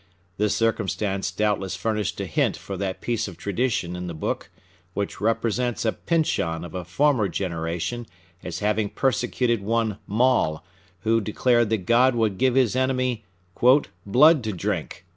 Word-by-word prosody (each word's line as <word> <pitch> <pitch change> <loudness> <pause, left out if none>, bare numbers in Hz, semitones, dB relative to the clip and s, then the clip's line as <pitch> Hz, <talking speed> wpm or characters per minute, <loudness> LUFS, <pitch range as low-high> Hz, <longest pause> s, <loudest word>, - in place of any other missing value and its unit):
This 105 0 +1
circumstance 105 -4 0
doubtless 95 0 -1
furnished 105 +1 -2
a - - -2
hint - - 0
for 100 - -7
that 95 0 -3
piece 115 -2 -1
of 90 -4 -9
tradition 100 -4 -1
in 90 0 -5
the 85 - -5
book 80 - -3 0.5
which 100 -1 -3
represents 115 +2 0
a 110 - +3
Pyncheon 85 - -1
of 85 - -10
a 90 - -4
former 125 - +2
generation 85 +5 -3 0.4
as - - -5
having 105 0 +1
persecuted 120 -2 0
one 110 0 0
Maule, 110 -9 +2 0.4
who 115 0 +2
declared 120 +2 +2
that 110 -5 -1
God 125 +3 +4
would 110 -5 0
give 130 -1 +3
his 130 -4 +3
enemy 130 -4 0 0.4
"blood 125 - +4
to 110 - -2
drink." 90 0 -3
110 Hz, 150 wpm, -24 LUFS, 95-120 Hz, 0.5 s, God